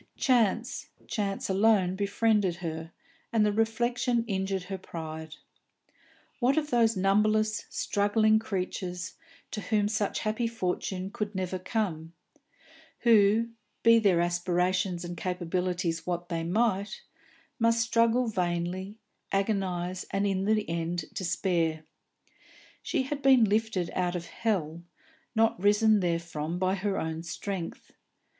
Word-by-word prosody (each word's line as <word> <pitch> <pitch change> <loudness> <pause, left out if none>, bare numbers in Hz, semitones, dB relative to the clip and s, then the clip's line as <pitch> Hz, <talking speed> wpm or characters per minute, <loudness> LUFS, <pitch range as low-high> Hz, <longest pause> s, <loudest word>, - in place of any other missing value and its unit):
Chance, 245 0 +1 0.2
chance 200 -3 -2
alone 195 -2 +3
befriended 200 -1 +1
her, 165 -2 -5 0.4
and 220 -2 +3
the 210 - +3
reflection 235 +2 +1
injured 190 -3 -2
her 190 +1 -5
pride. 160 -3 -7 1.0
What 260 +3 +2
of 300 -1 0
those 230 -3 +3
numberless 215 +3 +2
struggling 215 +2 +2
creatures 185 -3 -4 0.4
to 210 - -4
whom 210 -1 +1
such 210 -1 -1
happy 220 +2 0
fortune 190 -3 -3
could 210 -3 -4
never 185 0 -2
come, 180 -5 -2 0.9
who, 225 0 +5 0.3
be 230 0 +7
their 190 -6 +3
aspirations 175 +1 0
and 175 0 -5
capabilities 180 -1 -2
what 175 0 -3
they 165 -2 -1
might, 200 +2 0 0.6
must 230 0 +3
struggle 230 +2 +3
vainly, 185 0 -2 0.3
agonise, 185 -3 -1
and 195 +1 0
in 195 -1 0
the 215 0 +1
end 170 0 -2
despair? 170 -3 0 1.0
She - - 0
had 280 +2 -4
been 265 -3 +6
lifted 210 -4 0
out 180 -1 0
of 170 -1 -4
hell, 170 -8 -2 0.5
not 225 -4 +2
risen 210 +1 +4
therefrom 170 -2 -2
by 185 +1 +1
her 195 0 -1
own 160 0 -3
strength. 175 +2 -6
195 Hz, 120 wpm, -28 LUFS, 175-220 Hz, 1.0 s, be